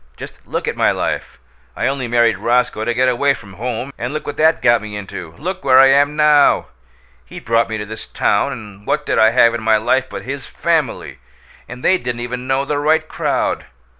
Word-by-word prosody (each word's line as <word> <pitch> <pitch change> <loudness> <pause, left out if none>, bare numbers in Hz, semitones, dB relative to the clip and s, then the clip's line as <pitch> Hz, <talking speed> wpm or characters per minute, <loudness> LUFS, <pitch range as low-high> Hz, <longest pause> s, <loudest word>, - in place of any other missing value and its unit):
Just - - -11
look - - -3
at - - -1
my - - +2
life! - - -3 0.4
I - - -2
only 135 -2 -1
married 115 -4 +2
Roscoe 120 0 0
to 120 - 0
get 130 +1 +2
away 135 +3 +2
from 100 -6 -13
home, 125 +5 -5
and 120 +2 -3
look 155 - -4
what 145 - -5
that 160 +1 +3
got 120 -1 +3
me 105 -1 -7
into! 85 -5 -8
look 180 +3 -5
where 130 -1 +5
I 135 0 +7
am 145 +2 +3
now! 150 -2 +4 0.5
He - - -10
brought 115 0 +1
me 110 - -3
to 105 - -5
this 110 +1 -9
town, 105 +7 0
and 105 -5 -10
what 150 - 0
did - - 0
I 110 - +6
have 115 0 +4
in 120 - -3
my 110 0 +3
life 120 +4 0
but - - -7
his 135 +2 -6
FAMILY? - - -2 0.5
And 125 +1 -9
they 185 0 +3
didn't 120 -1 -4
even 125 +1 -5
know 135 +1 0
the 145 0 -1
right 155 +2 +1
crowd! - - -2
125 Hz, 220 wpm, -18 LUFS, 110-140 Hz, 0.5 s, I